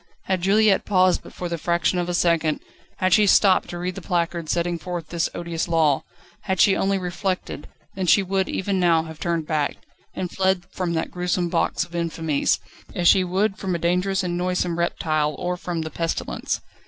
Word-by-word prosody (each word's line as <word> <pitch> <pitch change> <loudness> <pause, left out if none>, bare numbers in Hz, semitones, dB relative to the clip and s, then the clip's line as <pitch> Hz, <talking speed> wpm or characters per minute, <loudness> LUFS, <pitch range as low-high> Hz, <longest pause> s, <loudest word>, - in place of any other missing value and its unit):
Had 185 -2 -1
Juliette 205 +2 +4
paused 185 -2 +3
but - - -13
for 180 - -5
the 170 -1 -4
fraction 175 +2 +1
of 175 0 -2
a 175 - 0
second, 165 -3 +2 0.4
had 185 -1 +2
she 210 -1 +5
stopped 195 -1 +4
to 175 - -5
read 180 +1 -3
the 195 - -8
placard 170 -2 -1
setting 170 0 0
forth 175 -1 -5
this 170 -2 -1
odious 170 -1 -3
law, 160 -4 +2 0.4
had 190 -3 -1
she 195 - +5
only 195 +1 +1
reflected, 180 -3 -3 0.3
then 190 -1 -3
she 195 +4 +5
would 190 0 -1
even 190 0 -1
now 170 -2 +3
have 160 -1 -10
turned 170 -2 -1
back, 150 -2 -1 0.4
and 180 -1 -3
fled 190 -2 +1
from 180 -2 -2
that 160 0 -2
gruesome 180 0 -1
box - - 0
of 170 0 -13
infamies, 165 -3 0 0.4
as 175 -1 +1
she 190 - +6
would 195 +3 0
from 185 -2 -2
a - - 0
dangerous 180 +3 0
and 175 -1 -2
noisome 180 -1 -1
reptile 155 -3 0
or 180 0 -2
from 175 -2 -4
the 160 - -6
pestilence. 165 -1 -2
175 Hz, 195 wpm, -23 LUFS, 170-185 Hz, 0.4 s, she